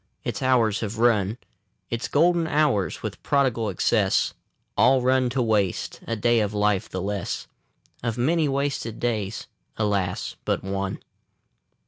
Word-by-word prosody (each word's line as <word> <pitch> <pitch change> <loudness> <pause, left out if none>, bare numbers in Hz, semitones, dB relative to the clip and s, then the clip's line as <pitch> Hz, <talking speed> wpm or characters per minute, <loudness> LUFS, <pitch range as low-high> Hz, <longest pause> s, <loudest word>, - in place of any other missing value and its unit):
Its - - -3
hours 120 -5 +3
have 110 0 -4
run, 110 -2 +2 0.5
Its 115 0 -2
golden 170 +2 +3
hours, 145 - +1
with - - -5
prodigal 125 -6 +1
excess, 90 - +2 0.4
All 130 +1 +4
run 130 0 +3
to 125 0 0
waste. 105 -5 0
A 115 - -1
day 120 +2 +3
of 105 -1 -1
life 105 -2 +1
the 95 - -4
less; 100 -1 -3 0.6
Of 115 -1 -2
many 155 +5 +2
wasted 135 -5 -2
days, 110 -4 -2 0.3
alas, 100 -4 -1
but - - -1
one! 95 0 -3
115 Hz, 135 wpm, -25 LUFS, 105-130 Hz, 0.6 s, All